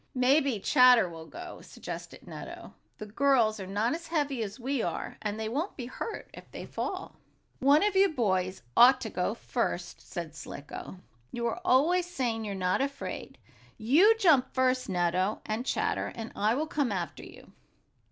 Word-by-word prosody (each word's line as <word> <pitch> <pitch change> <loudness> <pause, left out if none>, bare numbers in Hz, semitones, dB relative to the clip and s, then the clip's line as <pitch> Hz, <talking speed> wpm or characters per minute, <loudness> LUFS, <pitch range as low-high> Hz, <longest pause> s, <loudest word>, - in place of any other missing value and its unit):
"Maybe 260 -1 +3
Chatter 250 -2 +6
will 165 -1 -10
go," 350 +1 -9
suggested - - -9
Nutto. - - -9 0.2
"The 215 - -7
girls 225 -1 +2
are 190 - -6
not 210 +6 0
as 335 +1 -6
heavy 290 -6 -1
as 210 +2 -5
we 260 +1 -1
are, - - -4
and 210 0 -3
they 220 - -2
won't 295 - -3
be 250 - -5
hurt 340 - -6
if - - -12
they - - -8
fall." - - -5 0.4
"One 285 +5 +5
of 415 -1 +1
you 390 +1 +5
boys 185 - -1
ought 250 +2 +7
to 220 - -4
go 180 +4 -1
first," 230 -7 -3
said 170 -4 -5
Slicko. 145 +3 -8 0.3
"You 235 -1 -3
are 235 +10 -2
always 355 +3 +3
saying 240 -9 -2
you're 200 -2 -4
not 185 +4 0
afraid. 280 0 -5 0.4
You 335 - +5
jump 320 - +4
first, 255 -2 +1
Nutto, 185 +2 0
and 220 +4 -3
Chatter - - -1
and 225 0 -6
I 215 +3 +2
will 300 +4 0
come 290 -6 -1
after 180 -3 -4
you." - - -14
245 Hz, 170 wpm, -29 LUFS, 205-285 Hz, 0.4 s, ought